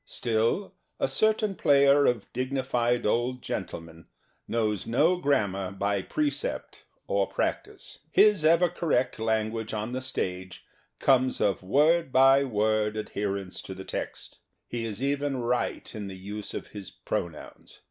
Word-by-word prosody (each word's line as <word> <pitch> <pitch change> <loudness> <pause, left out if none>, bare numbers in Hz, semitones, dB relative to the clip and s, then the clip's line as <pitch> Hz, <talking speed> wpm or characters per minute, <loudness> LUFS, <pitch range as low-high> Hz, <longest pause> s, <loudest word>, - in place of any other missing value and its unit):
Still, 115 - -1 0.3
a - - +2
certain 215 +8 +2
player 140 -3 +4
of 120 -4 0
dignified 125 -2 0
old 120 +3 0
gentle 90 -4 -4
men 85 0 -15 0.4
knows 110 -4 -1
no 155 +10 +3
grammar 100 - 0
by 100 0 -1
precept 305 - -3 0.2
or - - +1
practice. - - -4
His 210 -6 +5
ever 165 +3 +5
correct 155 -9 -1
language 110 0 -1
on 110 +3 -3
the 130 +1 -3
stage 95 -8 -4 0.3
comes 130 -1 +2
of 100 -2 +1
word 150 - +3
by 135 +1 +6
word 110 -3 0
ad 110 - -4
herence 100 -2 -3
to 95 - -8
the 95 0 -9
text. - - -6 0.3
He 120 -1 -4
is 110 +3 -5
even 140 0 0
right 125 0 -2
in 105 -3 -6
the 95 -1 -8
use 100 +2 -7
of - - -6
his 100 -3 -9
pronouns. 85 -3 -6
120 Hz, 145 wpm, -27 LUFS, 105-140 Hz, 0.4 s, by